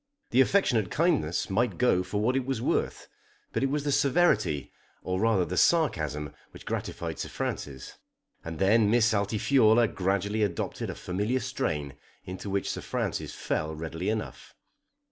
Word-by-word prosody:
The 130 - +5
affectionate 125 - +2
kindness 145 - +1
might 120 +5 0
go 125 -8 +3
for 90 +3 -3
what 120 +5 +1
it 135 - +1
was 135 -2 -2
worth; - - -1 0.5
but - - 0
it 135 - +1
was 145 +1 -1
the 145 - 0
severity, 140 - +2 0.3
or 90 0 -2
rather 110 -4 +2
the 90 - -4
sarcasm, 75 - +1 0.2
which - - -14
gratified - - -4
Sir - - -4
Francis. 65 -2 -5 0.4
And 80 -1 -6
then 105 +3 +4
Miss 115 0 +3
Altifiorla 110 +2 +3
gradually 100 +3 -1
adopted 100 -5 -2
a - - -5
familiar 105 +8 -1
strain 75 - -3 0.3
into 95 +2 -6
which 100 0 -1
Sir - - -5
Francis - - -3
fell 80 0 -2
readily 80 +4 -4
enough. 110 0 -5
105 Hz, 155 wpm, -28 LUFS, 90-125 Hz, 0.5 s, The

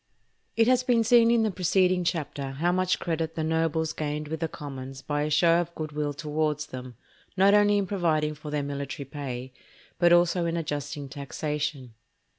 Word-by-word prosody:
It 225 0 +4
has 255 0 +4
been 245 -2 +2
seen 230 0 +5
in 235 -1 +4
the 215 - +1
preceding 185 0 +2
chapter 145 -5 -3
how 165 +6 +1
much 185 0 +1
credit 165 -1 -2
the 160 - -2
nobles 160 0 0
gained 150 0 -3
with 160 0 -3
the 165 - -1
commons 135 -3 -8
by 145 +1 -1
a 150 - -1
show 165 +3 +4
of 170 0 -7
good 155 -1 -5
will 150 0 -2
towards 150 0 -2
them, 125 -1 -9 0.4
not 195 +2 +5
only 205 0 +5
in 200 - +1
providing 160 -6 0
for 150 0 -9
their 150 -1 -1
military 140 0 -5
pay, 130 -2 -6 0.5
but 175 -1 +5
also 175 0 +4
in 165 0 -1
adjusting 145 -2 -4
taxation. 140 -2 -4
155 Hz, 185 wpm, -27 LUFS, 145-175 Hz, 0.5 s, seen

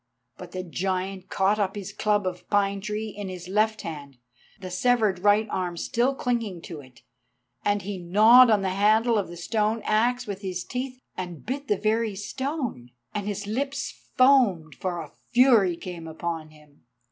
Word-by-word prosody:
But 180 +2 -10
the 185 0 -3
giant 185 +1 -3
caught 195 +2 +2
up 195 -1 0
his 200 -1 -6
club 210 -1 +1
of 180 -1 -5
pine 200 -1 +1
tree 210 +2 -3
in 205 -1 -6
his 180 -1 -7
left 215 +3 +1
hand, 145 -5 -7 0.4
the 185 -2 -7
severed 215 -1 +2
right 205 +3 +4
arm 175 -2 -2
still 245 +8 0
clinging 230 -10 -2
to 165 -4 -7
it. 130 -4 -16 0.6
And 205 -1 +1
he 195 0 -5
gnawed 220 +8 +7
on 210 -3 +3
the 190 - +1
handle 215 +4 +3
of 200 - -2
the 175 +1 -9
stone 215 +4 0
axe 245 +3 +1
with 200 -2 -5
his 185 -3 -4
teeth, 255 0 -5 0.2
and 175 -4 -6
bit 275 +4 -4
the 210 - +2
very 220 0 0
stone, 255 - -4 0.2
and 205 -1 -3
his 205 0 -3
lips 275 +6 -2 0.3
foamed, 240 - +4
for 180 -2 -3
a 155 - -10 0.2
fury 235 -9 +5
came 170 -3 -7
upon 160 0 -4
him. 150 -1 -21
200 Hz, 175 wpm, -26 LUFS, 180-225 Hz, 0.6 s, gnawed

